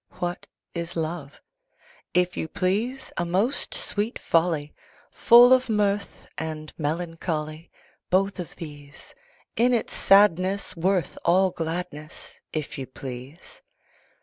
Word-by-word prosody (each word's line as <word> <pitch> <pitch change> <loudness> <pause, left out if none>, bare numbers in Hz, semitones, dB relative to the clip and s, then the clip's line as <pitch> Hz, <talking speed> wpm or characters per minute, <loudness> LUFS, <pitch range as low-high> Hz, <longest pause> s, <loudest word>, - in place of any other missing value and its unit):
What 175 0 -4 0.3
is 170 0 -5
Love? 160 -3 -4 0.8
If 180 0 +2
you - - -3
please, 215 +11 -1
A 175 - +1
most 195 +10 0
sweet 210 +4 -1
folly! 165 -3 +1 0.4
Full 245 +2 +7
of 255 -1 +3
mirth 205 -2 -1
and 155 -1 -5
melancholy: 160 0 -3 0.4
Both 195 +1 +1
of 175 - -6
these! 145 -3 -11 0.4
In 245 +2 +3
its 230 - -2
sadness 195 -1 +4
worth 180 -1 0
all 185 +2 +4
gladness, 165 -2 -6
If 155 -3 -4
you 130 - -5
please! 130 +4 -10
175 Hz, 115 wpm, -25 LUFS, 155-200 Hz, 0.8 s, Full